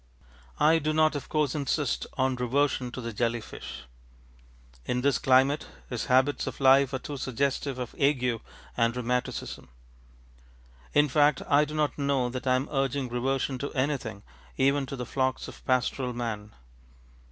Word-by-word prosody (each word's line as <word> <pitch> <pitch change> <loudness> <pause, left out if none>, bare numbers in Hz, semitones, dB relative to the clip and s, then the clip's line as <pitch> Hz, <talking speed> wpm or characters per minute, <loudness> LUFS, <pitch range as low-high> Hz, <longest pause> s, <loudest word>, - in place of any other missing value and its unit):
I 160 +2 +5
do 155 0 -1
not 155 0 +3
of 145 - -5
course 150 -3 +1
insist 145 0 -1
on 130 -1 +2
reversion 125 +1 0
to 130 - -5
the 115 -1 -5
jelly 120 +2 0
fish. 65 - -9 1.0
In 125 - -1
this 140 -1 +2
climate 135 +2 +3 0.2
his 120 -3 -2
habits 130 +3 +2
of - - -5
life 135 0 +5
are 130 - -1
too 145 +2 -6
suggestive 135 +1 -1
of 125 -2 -5
ague 125 -5 +2 0.3
and 115 0 +2
rheumatism. 125 - -3 1.3
In 145 0 +5
fact 145 +1 +3
I 145 +1 +4
do 150 +1 -7
not 150 -2 0
know 140 -3 +1
that 130 +1 -5
I 130 - +4
am 130 +3 -1
urging 135 -2 0
reversion 130 +2 -1
to 140 - -4
anything, 130 -7 -2 0.3
even 140 0 +2
to 135 - -5
the 125 -2 -5
flocks 130 +1 -1
of - - -12
pastoral 130 0 0
man. 110 -3 -5
130 Hz, 160 wpm, -28 LUFS, 125-140 Hz, 1.3 s, I